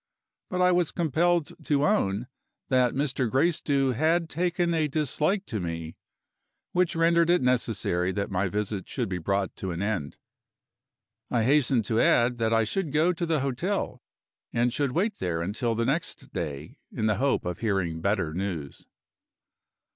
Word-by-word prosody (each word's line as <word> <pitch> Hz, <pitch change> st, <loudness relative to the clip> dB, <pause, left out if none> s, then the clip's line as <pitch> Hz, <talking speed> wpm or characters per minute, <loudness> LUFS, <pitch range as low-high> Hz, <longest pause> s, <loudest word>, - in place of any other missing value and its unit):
But 180 Hz, 0 st, 0 dB
I 180 Hz, -, +5 dB
was 175 Hz, -2 st, +2 dB
compelled 170 Hz, 0 st, +1 dB
to 145 Hz, -1 st, +2 dB
own 115 Hz, -, +1 dB, 0.4 s
that 130 Hz, -2 st, +3 dB
Mr. 135 Hz, -3 st, 0 dB
Gracedieu 140 Hz, -1 st, +2 dB
had 160 Hz, +6 st, +1 dB
taken 175 Hz, 0 st, 0 dB
a 160 Hz, -2 st, +1 dB
dislike 155 Hz, +7 st, 0 dB
to 110 Hz, -, -3 dB
me, 85 Hz, -2 st, -5 dB, 0.8 s
which 180 Hz, -1 st, +1 dB
rendered 170 Hz, 0 st, +3 dB
it 175 Hz, -5 st, +3 dB
necessary 115 Hz, -7 st, +1 dB
that 100 Hz, +1 st, -3 dB
my 95 Hz, +1 st, +1 dB
visit 100 Hz, 0 st, -3 dB
should -, -, -2 dB
be 90 Hz, -1 st, -2 dB
brought 100 Hz, +2 st, -1 dB
to 95 Hz, -, -4 dB
an 85 Hz, +2 st, -3 dB
end. 90 Hz, -10 st, -2 dB, 1.1 s
I 120 Hz, -2 st, +1 dB
hastened 130 Hz, -3 st, +3 dB
to 115 Hz, 0 st, +1 dB
add 120 Hz, 0 st, +3 dB
that 115 Hz, -1 st, +1 dB
I 115 Hz, 0 st, +4 dB
should 160 Hz, -, -2 dB
go 160 Hz, +5 st, +3 dB
to 170 Hz, 0 st, -3 dB
the 160 Hz, -4 st, +1 dB
hotel, 140 Hz, +10 st, -2 dB, 0.5 s
and 120 Hz, +1 st, +1 dB
should 140 Hz, -3 st, 0 dB
wait 205 Hz, +6 st, 0 dB
there 85 Hz, -2 st, -1 dB
until 115 Hz, +5 st, -1 dB
the 115 Hz, +1 st, 0 dB
next 155 Hz, +7 st, -3 dB
day, 75 Hz, +1 st, -5 dB
in 110 Hz, -, -2 dB
the 105 Hz, -2 st, +2 dB
hope 135 Hz, +4 st, +1 dB
of 90 Hz, -1 st, -3 dB
hearing 95 Hz, -7 st, -1 dB
better 95 Hz, -5 st, 0 dB
news. 85 Hz, -6 st, -5 dB
125 Hz, 160 wpm, -27 LUFS, 100-165 Hz, 1.1 s, I